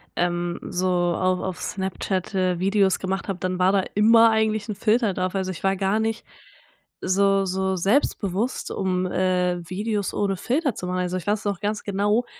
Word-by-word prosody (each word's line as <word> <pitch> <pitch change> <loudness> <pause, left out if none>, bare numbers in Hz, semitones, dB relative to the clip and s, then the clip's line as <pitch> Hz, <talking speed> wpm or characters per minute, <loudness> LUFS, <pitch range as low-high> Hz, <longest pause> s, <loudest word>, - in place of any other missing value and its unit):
ähm, 175 0 -1
so 185 +1 -2
auf 180 +1 +1
auf 185 -2 -4
Snapchat, 190 0 -3
äh, 185 -2 +1
Videos 195 0 +2
gemacht 190 0 -3
habe, 195 -3 -2
dann 185 0 -2
war 185 +1 +4
da 195 -1 +3
immer 225 +2 +6
eigentlich 220 -1 0
'n - - -1
Filter 220 0 +2
drauf. 185 +1 -2
Also, 190 -1 -1
ich 180 - -9
war 195 0 +2
gar 195 +3 0
nicht 225 +1 -2 0.8
so 195 +1 +2
so 190 +1 -1
selbstbewusst, 200 +2 0
um, 185 -1 -1
äh, 180 -1 +1
Videos 205 +1 -2
ohne 200 -1 0
Filter 270 - 0
zu 180 - -5
machen. 180 0 -1
Also, 180 0 -2
ich 180 - -8
weiß 210 +1 0
noch 200 -3 -1
ganz 210 +1 -2
genau, 205 +4 +1
190 Hz, 185 wpm, -24 LUFS, 185-210 Hz, 0.8 s, immer